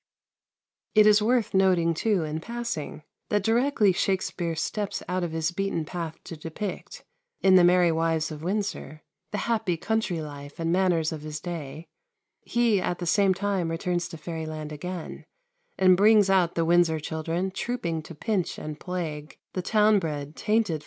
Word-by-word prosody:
It 215 Hz, 0 st, +7 dB
is 210 Hz, 0 st, +6 dB
worth 235 Hz, 0 st, +1 dB
noting 185 Hz, -3 st, +3 dB
too, 195 Hz, +1 st, +1 dB
in 155 Hz, 0 st, -3 dB
passing, 230 Hz, -8 st, -5 dB, 0.3 s
that 205 Hz, -2 st, +1 dB
directly 225 Hz, -2 st, +3 dB
Shakspere 180 Hz, -2 st, -1 dB
steps 205 Hz, +5 st, -3 dB
out 180 Hz, 0 st, -1 dB
of 170 Hz, -, -2 dB
his 160 Hz, +1 st, -1 dB
beaten 185 Hz, -3 st, -2 dB
path 165 Hz, -1 st, -5 dB
to 165 Hz, -, -8 dB
depict, 165 Hz, +5 st, -6 dB, 0.4 s
in 190 Hz, -, +5 dB
"The 185 Hz, -1 st, +7 dB
Merry 175 Hz, -1 st, +5 dB
Wives 165 Hz, -1 st, 0 dB
of 150 Hz, -1 st, -7 dB
Windsor," 180 Hz, -5 st, -3 dB, 0.3 s
the 210 Hz, -, -3 dB
happy 215 Hz, -7 st, 0 dB
country 205 Hz, -1 st, -1 dB
life 145 Hz, -1 st, -8 dB
and 165 Hz, 0 st, 0 dB
manners 175 Hz, -3 st, +2 dB
of 155 Hz, -2 st, -5 dB
his 150 Hz, 0 st, -6 dB
day, 160 Hz, -2 st, -6 dB, 0.5 s
he 235 Hz, -5 st, +1 dB
at 175 Hz, -, -1 dB
the 175 Hz, -, -5 dB
same 190 Hz, +2 st, +3 dB
time 190 Hz, -3 st, -1 dB
returns 175 Hz, +1 st, -1 dB
to 165 Hz, -, -9 dB
fairyland 155 Hz, -1 st, -5 dB
again, 175 Hz, +3 st, -6 dB, 0.5 s
and 185 Hz, -1 st, +6 dB
brings 205 Hz, 0 st, +5 dB
out 180 Hz, -3 st, +3 dB
the 165 Hz, -, +1 dB
Windsor 170 Hz, -1 st, +3 dB
children 165 Hz, +4 st, -3 dB
trooping 185 Hz, -6 st, -3 dB
to 165 Hz, +1 st, -11 dB
pinch 190 Hz, +3 st, -1 dB
and 155 Hz, 0 st, -6 dB
plague 160 Hz, -5 st, -5 dB, 0.2 s
the 185 Hz, -, -2 dB
town 210 Hz, +1 st, +4 dB
bred, 150 Hz, -3 st, -4 dB
tainted 220 Hz, 0 st, +1 dB
Falstaff. 160 Hz, -2 st, -1 dB
175 Hz, 165 wpm, -26 LUFS, 160-200 Hz, 0.5 s, It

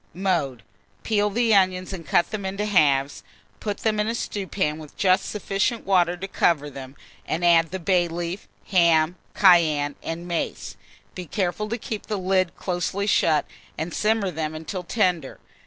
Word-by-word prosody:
Mode. 170 Hz, -, -1 dB, 0.4 s
Peel 210 Hz, -1 st, +1 dB
the 230 Hz, +2 st, +2 dB
onions 185 Hz, -1 st, +2 dB
and 175 Hz, -3 st, -6 dB
cut 165 Hz, +3 st, +1 dB
them 215 Hz, -2 st, -4 dB
in 190 Hz, +1 st, -4 dB
halves; 150 Hz, -10 st, +2 dB, 0.4 s
put 205 Hz, -2 st, -4 dB
them 215 Hz, -1 st, +1 dB
in 210 Hz, -, +1 dB
a 230 Hz, -, -1 dB
stewpan, 190 Hz, -8 st, -2 dB
with 155 Hz, -2 st, -12 dB
just 190 Hz, -1 st, +3 dB
sufficient 205 Hz, +3 st, -1 dB
water 180 Hz, -2 st, +2 dB
to 195 Hz, +2 st, -5 dB
cover 150 Hz, -6 st, +1 dB
them, 135 Hz, 0 st, -9 dB, 0.3 s
and 170 Hz, +2 st, -1 dB
add 165 Hz, -1 st, +5 dB
the 190 Hz, -, -4 dB
bay 180 Hz, -1 st, +2 dB
leaf, 170 Hz, +3 st, -5 dB, 0.2 s
ham, 170 Hz, -3 st, +4 dB, 0.2 s
cayenne, 155 Hz, -6 st, +4 dB
and 170 Hz, +2 st, -5 dB
mace; 170 Hz, -1 st, -3 dB, 0.4 s
be 180 Hz, -2 st, -7 dB
careful 195 Hz, +4 st, -2 dB
to 230 Hz, -, -2 dB
keep 215 Hz, -2 st, -6 dB
the 210 Hz, -, -2 dB
lid 185 Hz, -1 st, +1 dB
closely 185 Hz, +2 st, -2 dB
shut, 160 Hz, -6 st, +3 dB, 0.3 s
and 160 Hz, +2 st, -4 dB
simmer 215 Hz, -3 st, +1 dB
them 155 Hz, -2 st, -4 dB
until 160 Hz, +4 st, -5 dB
tender. 180 Hz, -7 st, -1 dB
180 Hz, 165 wpm, -24 LUFS, 165-200 Hz, 0.4 s, add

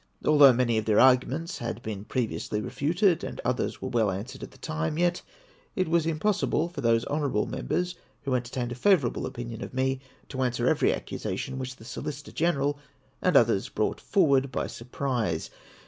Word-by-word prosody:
Although 145 Hz, -3 st, +8 dB
many 120 Hz, -2 st, +2 dB
of 110 Hz, -, -4 dB
their 110 Hz, -1 st, +3 dB
arguments 130 Hz, +6 st, +3 dB
had 120 Hz, 0 st, -4 dB
been 105 Hz, -2 st, -5 dB
previously 115 Hz, -4 st, -2 dB
re -, -, -5 dB
futed, 170 Hz, +4 st, +2 dB
and -, -, -5 dB
others 125 Hz, +1 st, -1 dB
were 130 Hz, -, -2 dB
well 115 Hz, -4 st, +2 dB
answered 100 Hz, +7 st, -5 dB
at -, -, -7 dB
the -, -, -18 dB
time, 80 Hz, -, -3 dB
yet 175 Hz, +1 st, +1 dB, 0.5 s
it 185 Hz, -3 st, +1 dB
was 165 Hz, 0 st, +2 dB
impossible 165 Hz, 0 st, +1 dB
for 160 Hz, -5 st, -6 dB
those 115 Hz, -1 st, +3 dB
honourable 140 Hz, -7 st, 0 dB
Members 180 Hz, -, -2 dB, 0.3 s
who 135 Hz, -, -1 dB
enter 120 Hz, -1 st, -1 dB
tained 120 Hz, -1 st, -2 dB
a -, -, -1 dB
favourable 140 Hz, -, +2 dB
opinion 120 Hz, -3 st, -6 dB
of -, -, -8 dB
me 130 Hz, 0 st, 0 dB, 0.3 s
to 130 Hz, -2 st, -4 dB
answer 120 Hz, -1 st, 0 dB
every -, -, +3 dB
accusation 130 Hz, -, -4 dB
Avhich 130 Hz, 0 st, -5 dB
the 110 Hz, -, -15 dB
Solicitor 145 Hz, +3 st, -6 dB
Greneral 145 Hz, -4 st, +1 dB, 0.4 s
and -, -, +4 dB
others -, -, +3 dB
brought -, -, -1 dB
forward 140 Hz, -8 st, +3 dB
by -, -, -1 dB
surprise. 120 Hz, -, -3 dB
130 Hz, 180 wpm, -27 LUFS, 120-155 Hz, 0.5 s, Although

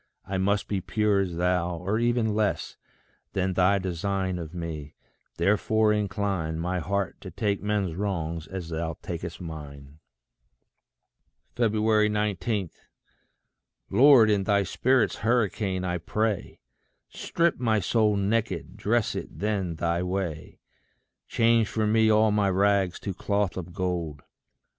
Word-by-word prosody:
I 95 Hz, -1 st, -2 dB
must 100 Hz, +2 st, +1 dB
be 100 Hz, -2 st, -1 dB
pure 105 Hz, 0 st, +1 dB
as 90 Hz, -3 st, -1 dB
thou, 90 Hz, 0 st, 0 dB
or 95 Hz, +6 st, -1 dB
ever 120 Hz, 0 st, +2 dB
less 105 Hz, -2 st, -1 dB, 0.6 s
Than 95 Hz, 0 st, 0 dB
thy 95 Hz, +2 st, +3 dB
design 95 Hz, 0 st, -2 dB
of 80 Hz, -2 st, -7 dB
me 80 Hz, -4 st, -6 dB, 0.4 s
therefore 105 Hz, +4 st, +2 dB
incline 100 Hz, -5 st, -1 dB
My 90 Hz, +2 st, -1 dB
heart 100 Hz, +2 st, -2 dB
to -, -, -8 dB
take 100 Hz, -2 st, -1 dB
men's 105 Hz, -4 st, -1 dB
wrongs 85 Hz, -4 st, -3 dB
as 95 Hz, -3 st, -6 dB
thou 80 Hz, 0 st, -3 dB
tak'st 85 Hz, -1 st, -5 dB
mine. 75 Hz, -4 st, -9 dB, 1.6 s
19. 105 Hz, -3 st, +1 dB, 1.2 s
Lord, 125 Hz, -5 st, +7 dB
in 100 Hz, -2 st, +1 dB
thy 100 Hz, -1 st, +3 dB
spirit's 125 Hz, +7 st, +1 dB
hurricane, 105 Hz, -5 st, 0 dB
I 90 Hz, -1 st, -1 dB
pray, 105 Hz, +3 st, -2 dB, 0.5 s
Strip 170 Hz, -4 st, 0 dB
my 110 Hz, -3 st, +2 dB
soul 105 Hz, +2 st, +2 dB
naked 100 Hz, -4 st, -1 dB
dress 115 Hz, +1 st, +1 dB
it -, -, -5 dB
then 100 Hz, -5 st, -1 dB
thy 85 Hz, +1 st, 0 dB
way. 90 Hz, -4 st, -4 dB, 0.7 s
Change 115 Hz, -1 st, +3 dB
for 110 Hz, +1 st, -1 dB
me 110 Hz, +1 st, +3 dB
all 110 Hz, 0 st, +4 dB
my 105 Hz, -1 st, +2 dB
rags 95 Hz, -1 st, +2 dB
to 100 Hz, -, -3 dB
cloth 100 Hz, 0 st, -1 dB
of 90 Hz, -1 st, -6 dB
gold. 85 Hz, -6 st, -3 dB
100 Hz, 130 wpm, -26 LUFS, 90-105 Hz, 1.6 s, Lord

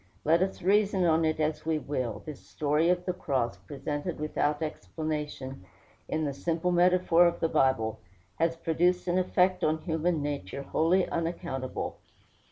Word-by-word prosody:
Let 165 Hz, +3 st, +4 dB
us 190 Hz, -2 st, -1 dB
reason 195 Hz, -1 st, +3 dB
on 165 Hz, -1 st, +3 dB
it 155 Hz, 0 st, 0 dB
as 155 Hz, 0 st, 0 dB
we 160 Hz, 0 st, 0 dB
will, 130 Hz, -8 st, -3 dB
this 150 Hz, -3 st, -7 dB
story 150 Hz, +3 st, 0 dB
of 180 Hz, 0 st, +1 dB
the 180 Hz, -, 0 dB
cross, 135 Hz, -9 st, -1 dB
presented 145 Hz, +3 st, -5 dB
without 150 Hz, 0 st, 0 dB
explanation 150 Hz, -, -4 dB, 0.4 s
in 155 Hz, 0 st, -1 dB
the 140 Hz, -, -2 dB
simple 165 Hz, +4 st, -1 dB
metaphor 175 Hz, -1 st, +5 dB
of 170 Hz, -, -1 dB
the 165 Hz, -, +2 dB
Bible, 115 Hz, -7 st, +1 dB, 0.4 s
has 165 Hz, 0 st, +2 dB
produced 175 Hz, +3 st, +1 dB
an 180 Hz, +1 st, +2 dB
effect 185 Hz, 0 st, +2 dB
on 155 Hz, +1 st, +2 dB
human 160 Hz, -2 st, 0 dB
nature 140 Hz, -4 st, -4 dB
wholly 175 Hz, +6 st, +2 dB
unaccountable. 165 Hz, -6 st, -3 dB
160 Hz, 155 wpm, -29 LUFS, 145-175 Hz, 0.4 s, metaphor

